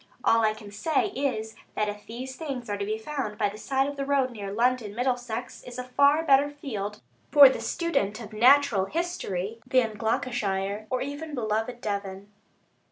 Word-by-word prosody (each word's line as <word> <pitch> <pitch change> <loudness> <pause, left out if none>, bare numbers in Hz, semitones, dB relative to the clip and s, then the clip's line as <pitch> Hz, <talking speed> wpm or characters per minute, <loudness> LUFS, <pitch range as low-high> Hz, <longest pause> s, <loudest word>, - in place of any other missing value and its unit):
All 230 0 +4
I 215 0 +2
can 210 -2 -11
say 320 - 0
is, 240 - -2 0.2
that 210 - +1
if 205 0 -6
these 255 +3 -6
things 260 -8 -5
are 205 - -1
to 200 - -1
be 215 +1 -2
found 220 -3 -4
by 205 -1 +1
the 205 - -9
side 270 +2 0
of 285 0 -5
the 275 - -1
road 275 -2 +1
near 200 -4 -6
London, 230 -1 +1
Middlesex 245 -1 -2
is 245 0 -9
a 250 - -3
far 280 +5 +3
better 280 0 +5
field 215 -8 -5 0.3
for 285 -2 +10
the - - -3
student 220 - -1
of 220 -2 -9
natural 245 -3 +5
history 225 - -3
than 245 -4 +1
Gloucestershire, 210 -3 -1
or 255 - 0
even 290 +2 -6
beloved 225 +1 -2
Devon. 200 -1 -4
240 Hz, 180 wpm, -27 LUFS, 210-275 Hz, 0.3 s, for